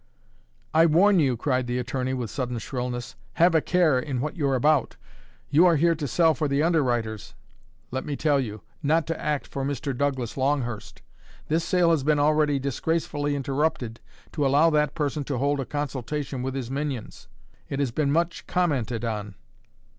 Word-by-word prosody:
"I 165 +1 +6
warn 185 +5 +5
you," 130 -6 +2
cried 130 0 0
the 120 0 -1
attorney, 125 +1 -2
with 120 -5 -4
sudden 125 -2 -3
shrillness. 125 +1 -4 0.2
"Have 170 +1 +4
a 160 - +4
care 160 -8 +2
what 140 +7 -2
you're 140 -6 +1
about. 145 +1 +2 0.6
You 165 +5 +6
are 170 - +4
here 165 +3 +3
to 150 -3 -4
sell 165 +4 +3
for 150 +1 -1
the 140 +1 +1
underwriters, 120 - 0 0.6
let 130 +1 -3
me 145 - -3
tell 145 -1 +2
you 110 -5 -4 0.2
not 160 +2 +2
to 165 - -4
act 150 -2 -1
for 135 - -5
Mr. 140 0 -2
Douglas 135 -3 -2
Longhurst. 120 -6 -2 0.5
This 160 +2 +1
sale 175 -2 +3
has 155 -5 +2
been 150 +1 +3
already 150 0 +3
disgracefully 145 +1 -1
interrupted 135 -4 -1 0.3
to 150 - -1
allow 145 +4 +4
that 150 -1 +1
person 150 -1 -1
to 135 -2 -2
hold 140 +2 0
a 135 - -2
consultation 140 -1 -4
with 130 +1 -3
his 130 -2 -4
minions. 140 -4 -4 0.4
It 140 - -3
has 140 -4 0
been 140 +2 0
much 170 +3 -1
commented 125 -10 0
on." 105 -3 -4
140 Hz, 175 wpm, -25 LUFS, 125-155 Hz, 0.6 s, I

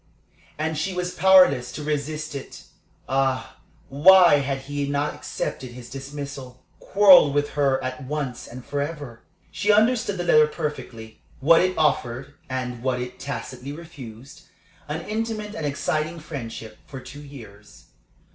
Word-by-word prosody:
And 155 0 -2
she 190 +3 -2
was 180 0 -2
powerless 180 -10 +5
to 150 - -6
resist 150 +1 -3
it. 140 -1 -8 0.4
Ah, 130 -1 -1 0.3
why 175 +3 +7
had 135 -1 -2
he 145 +1 -3
not 145 +1 -1
accepted 125 -2 -5
his 120 -1 -11
dismissal 135 -2 -8
quarrelled 190 -8 +6
with 145 0 +1
her 140 -2 +2
at 130 0 -5
once 140 -3 -4
and 125 +1 -10
forever? 145 -4 -5 0.3
She 205 +1 +1
understood 220 -1 +2
the 175 - -2
letter 155 -3 +5
perfectly 140 -8 -6 0.2
what 165 +5 +5
it 185 0 0
offered, 135 -3 0 0.2
and 125 -2 -4
what 130 -1 -1
it 125 0 -6
tacitly 130 0 -6
refused. 140 -7 -11 0.4
An 155 +3 -3
intimate 215 -1 -3
and 155 -7 -3
exciting 155 +3 -2
friendship 115 -8 -8
for 135 - -8
two 145 +3 -11
years. 110 -8 -13
145 Hz, 140 wpm, -24 LUFS, 130-160 Hz, 0.4 s, why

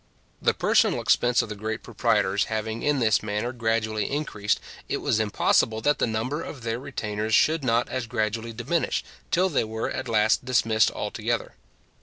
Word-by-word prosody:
The - - +2
personal - - +3
expense 120 0 +3
of - - -8
the 105 - -5
great 110 +2 -4
proprietors 95 +2 +1
having 110 +1 -3
in 150 -1 +1
this 110 -5 +3
manner 105 +3 -2
gradually 110 -2 -1
increased, 110 -8 -1 0.3
it - - 0
was 110 - 0
impossible 110 +1 +2
that 145 +4 +2
the - - +2
number 115 +8 -2
of 130 -7 -8
their 115 0 -2
retainers 110 -5 -2
should 160 -1 +3
not 120 -1 +2
as 130 -2 -3
gradually 115 0 -2
diminish, 125 +9 -1 0.3
till 185 +2 +3
they 155 -10 +1
were 110 0 -3
at - - -4
last 110 +1 +3
dismissed 115 -3 +3
altogether. - - -3
115 Hz, 170 wpm, -25 LUFS, 110-125 Hz, 0.3 s, personal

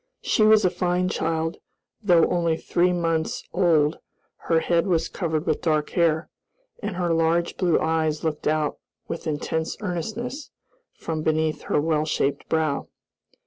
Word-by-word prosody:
She - - +1
was 215 -1 +6
a 180 - +3
fine 180 0 0
child; 165 -1 -1 0.4
though 175 -6 +5
only 170 -2 +1
three 175 +2 +1
months 165 -2 -1
old 165 -4 +3 0.5
her 165 -1 +4
head 170 +2 +1
was 170 -3 +1
covered 160 -3 -2
with - - 0
dark 155 -2 0
hair, 165 -2 +2 0.5
and - - -3
her 175 -2 0
large 165 +1 +1
blue 175 -3 +2
eyes 160 -1 0
looked 155 -2 -2
out 155 -1 0 0.3
with 165 - -5
intense 160 +1 -2
earnestness 220 - -4 0.5
from 160 -1 -3
beneath 155 0 0
her - - +3
well 155 0 +1
shaped 145 -2 -1
brow. 155 -3 0
165 Hz, 145 wpm, -24 LUFS, 155-175 Hz, 0.5 s, was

